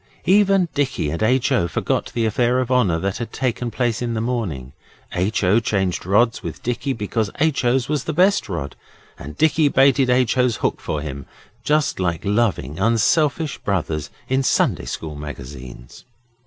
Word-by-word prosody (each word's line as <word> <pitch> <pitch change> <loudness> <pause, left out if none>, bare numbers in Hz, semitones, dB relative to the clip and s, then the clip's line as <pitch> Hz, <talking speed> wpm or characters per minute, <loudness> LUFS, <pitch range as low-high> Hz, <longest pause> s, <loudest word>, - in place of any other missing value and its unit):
Even 195 0 +4
Dicky 135 - -1
and 85 - -4
H. 130 +4 +2
O. 120 -10 +2
forgot - - -2
the 115 -1 +1
affair 125 +2 +1
of 130 0 -2
honour 105 -10 +3
that 95 +3 -2
had 115 -2 -5
taken 125 -2 -2
place 120 -1 -1
in 120 -1 -2
the - - -1
morning. 105 - -3 0.4
H. 95 +4 0
O. 100 +5 +4
changed 95 -6 -1
rods 115 +4 +2
with - - -7
Dicky 125 +3 -2
because 110 -2 -2
H. 155 -2 +1
O.'s 125 +1 +2
was 150 -2 -2
the - - -1
best 185 - +2
rod, 75 -7 -4 0.4
and 75 +2 -9
Dicky 160 -1 +3
baited 135 -1 +4
H. 125 0 +2
O.'s 125 -2 +3
hook - - -2
for 75 - -3
him, 70 -2 -7 0.4
just 150 -3 +1
like 85 -3 -1
loving, 100 - 0
unselfish 140 - +1
brothers 80 -7 -2 0.2
in 130 +1 +1
Sunday 135 - +1
School 80 -2 -5
magazines. 65 -4 -9
115 Hz, 170 wpm, -21 LUFS, 90-130 Hz, 0.4 s, Even